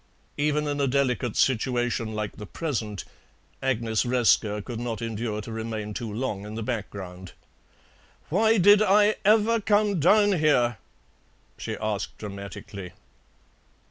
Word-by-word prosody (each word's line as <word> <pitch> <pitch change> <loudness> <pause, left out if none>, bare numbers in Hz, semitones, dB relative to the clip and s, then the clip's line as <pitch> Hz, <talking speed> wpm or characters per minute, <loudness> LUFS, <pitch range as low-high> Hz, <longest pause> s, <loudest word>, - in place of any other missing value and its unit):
Even 150 +1 +1
in 145 -1 -1
a 140 - +2
delicate 125 -4 0
situation 120 -2 0
like 105 -1 -4
the 105 - -8
present, 110 - -4 0.6
Agnes 115 -4 0
Resker 120 -4 +2
could 120 -3 -5
not 115 -3 -3
endure 115 -1 -3
to 115 - -8
remain 110 -1 -4
too 115 -1 -5
long 105 -3 -3
in 105 +1 -7
the 115 - -4
background. 95 -6 -6 1.0
"Why 220 +6 +3
did 205 +2 +6
I 210 +1 +4
ever 220 +2 +4
come 205 -2 +2
down 205 +3 +4
here?" 120 -8 +2 0.8
she - - -5
asked 105 -2 -3
dramatically. 100 -2 -8
120 Hz, 130 wpm, -26 LUFS, 105-150 Hz, 1.0 s, did